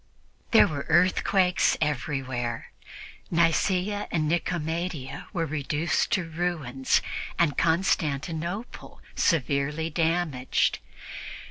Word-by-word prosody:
There 225 - +7
were 145 -3 -4
earthquakes 180 +2 +3
everywhere; 130 -4 -2 0.6
Nicea 180 +4 +1
and 155 -3 0
Nicomedia 165 -4 -2
were 170 -5 -1
reduced 150 +2 -1
to 190 - +2
ruins 155 -6 0 0.3
and 160 -4 +2
Constantinople 165 - -1 0.2
severely 150 - +1
damaged. 160 -5 +1
160 Hz, 80 wpm, -26 LUFS, 140-175 Hz, 0.6 s, There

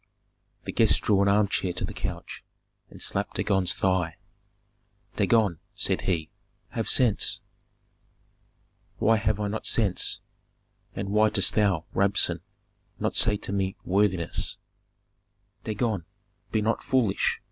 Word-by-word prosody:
The - - -5
guest - - +4
drew 100 -2 +3
an 100 - +3
armchair 100 -3 +2
to 90 - -2
the - - -8
couch, - - -6 0.5
and - - -13
slapped - - -3
Dagon's 95 -3 +1
thigh. 90 -4 0 1.0
"Dagon," 105 -8 +2 0.2
said - - 0
he, 85 -4 -1 0.4
"have - - -2
sense." 120 -5 +3 1.6
"Why 115 +1 +3
have 110 -1 0
I 105 - -1
not 110 +2 -3
sense, 105 -6 +1 0.8
and 100 0 -4
why 105 +1 +4
dost 105 -2 +2
thou, 100 -7 +2
Rabsun, 100 +1 +3 0.6
not - - -1
say 105 - +4
to 100 - -5
me 95 0 -1
worthiness?" 95 -3 0 1.1
"Dagon, 105 -4 -2 0.5
be 110 -1 +1
not 115 +2 0
foolish!" 120 -7 +1
100 Hz, 125 wpm, -26 LUFS, 95-110 Hz, 1.6 s, guest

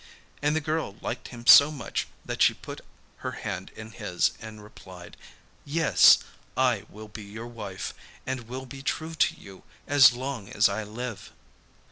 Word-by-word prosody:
And 150 +1 +1
the 160 - +1
girl 155 -9 -2
liked 120 - -5
him 120 -1 -11
so 140 +4 +9
much 140 -8 -4 0.2
that - - -4
she - - +5
put - - -9 0.4
her - - -5
hand - - -5
in 110 0 -9
his 90 -3 0
and 110 -2 -10
replied: 95 -4 -13 0.5
'Yes, 160 +1 +6 0.4
I 125 -6 +2
will 110 +1 -11
be 105 0 -9
your 110 +3 -9
wife, 105 -6 -6 0.3
and 130 -3 -4
will 130 +2 -6
be 135 +1 -10
true 160 +4 -3
to 165 0 +2
you 95 -1 -13 0.2
as 140 -3 +7
long 125 -4 -5
as 100 - +4
I 100 +2 -3
live. 110 0 -7
120 Hz, 165 wpm, -27 LUFS, 105-140 Hz, 0.5 s, so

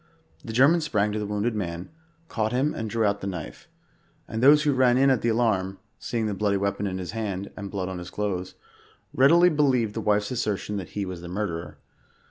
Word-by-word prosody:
The 115 - -6
German 140 +9 +4
sprang 105 -9 0
to 105 - -2
the 105 - -3
wounded 105 +3 -1
man, 90 -4 -4 0.4
caught 110 -6 -1
him 135 +4 +1
and 110 -1 -4
drew 115 +1 0
out 100 0 0
the 100 - -4
knife; 90 -5 -7 0.6
and 110 +1 -4
those 150 +3 +7
who 145 -1 +2
ran 125 -1 +4
in 135 +1 +5
at 130 - +2
the 120 - +1
alarm, 105 -5 +1 0.2
seeing 115 -2 -2
the 105 - -1
bloody 100 0 0
weapon 100 +1 -1
in 95 -1 -3
his 90 -1 -5
hand, 100 -3 -4
and 100 -1 -6
blood 95 -2 -3
on 95 -1 -5
his 90 0 -8
clothes, 95 -2 -3 0.6
readi 145 +6 +6
ly 180 - +8
believed 130 -8 +2
the 115 - -3
wife's 105 0 +1
assertion 105 -4 -2
that 95 -4 -6
he 100 - -1
was 90 -2 -6
the 85 - -8
murderer. 90 -3 -4
105 Hz, 220 wpm, -25 LUFS, 95-120 Hz, 0.6 s, ly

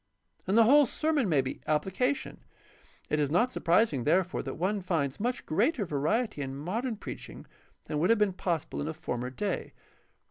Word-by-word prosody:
And 195 +4 +2
the 230 - +8
whole 280 +4 +6
sermon 300 -5 0
may 145 -5 +4
be 130 - -6
applica 190 - +1
tion. - - -9 0.7
It 150 - +2
is 145 -2 +1
not 230 - +2
surprising, 170 - +2
therefore, 175 +6 +1
that - - -5
one 195 +5 -1
finds 155 -7 -1
much 245 +4 -2
greater 215 - +1
variety 160 - -1
in 135 -1 -4
modem 215 - -3
preaching - - -8 0.4
than 150 - -2
would 175 - +2
have 230 - +5
been 210 -2 +2
possible 170 -6 -2
in 145 - -3
a 160 - -4
former 125 -5 -4
day. 200 +10 -3
185 Hz, 180 wpm, -29 LUFS, 150-230 Hz, 0.7 s, the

